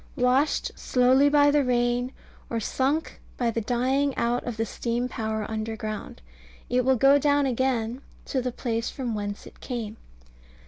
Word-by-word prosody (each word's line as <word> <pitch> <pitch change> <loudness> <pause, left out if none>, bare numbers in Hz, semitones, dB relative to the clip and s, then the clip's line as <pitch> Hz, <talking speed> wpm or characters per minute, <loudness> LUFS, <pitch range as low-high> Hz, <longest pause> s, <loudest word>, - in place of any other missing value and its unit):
Washed 260 +3 +2
slowly 260 +3 +4
by 290 0 +5
the 290 -1 +3
rain, 245 0 +1 0.4
or 230 - -1
sunk 270 +8 -1 0.2
by 240 -2 +1
the 230 - -2
dying 260 +5 +1
out 240 +1 0
of 240 -2 -4
the 225 - 0
steam 235 +3 -2
power 220 -3 -3
underground, 215 - -5 0.5
it 250 0 +3
will 260 +1 +4
go 275 +4 +5
down 285 0 +3
again 250 -1 0 0.2
to 260 - -1
the 250 0 -2
place 230 -1 -2
from 250 -4 -4
whence 205 -1 -4
it - - -14
came. 230 -4 -5
245 Hz, 155 wpm, -26 LUFS, 225-265 Hz, 0.5 s, by